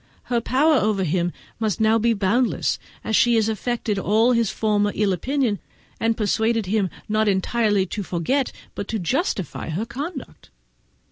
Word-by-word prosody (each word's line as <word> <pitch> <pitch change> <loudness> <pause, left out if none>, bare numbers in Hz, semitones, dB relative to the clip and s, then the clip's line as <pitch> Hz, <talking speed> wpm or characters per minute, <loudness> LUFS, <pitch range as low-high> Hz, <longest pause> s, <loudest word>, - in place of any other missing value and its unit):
Her 235 - +2
power 290 +6 +3
over 210 -4 +1
him 175 +1 0 0.3
must 215 -5 -1
now 220 +1 +4
be 230 +1 +3
boundless, 215 +5 +1 0.2
as 220 - 0
she 240 +2 +4
has 220 -1 +3
entirely 225 +2 -1
effaced 210 -3 0
all 220 +5 +3
his 230 -4 +2
former 205 -1 +1
ill 205 -2 +2
opinion, 245 - 0 0.4
and 225 0 +1
persuaded 220 +1 +1
him 200 0 +1 0.2
not 215 0 +1 0.2
merely 210 -5 +1
to 205 +3 -4
forget 195 - -1 0.2
but 200 - -5
to 225 - -2
justify 200 - -2
her 180 +8 -2
conduct. 285 +4 -7
220 Hz, 160 wpm, -23 LUFS, 200-235 Hz, 0.4 s, now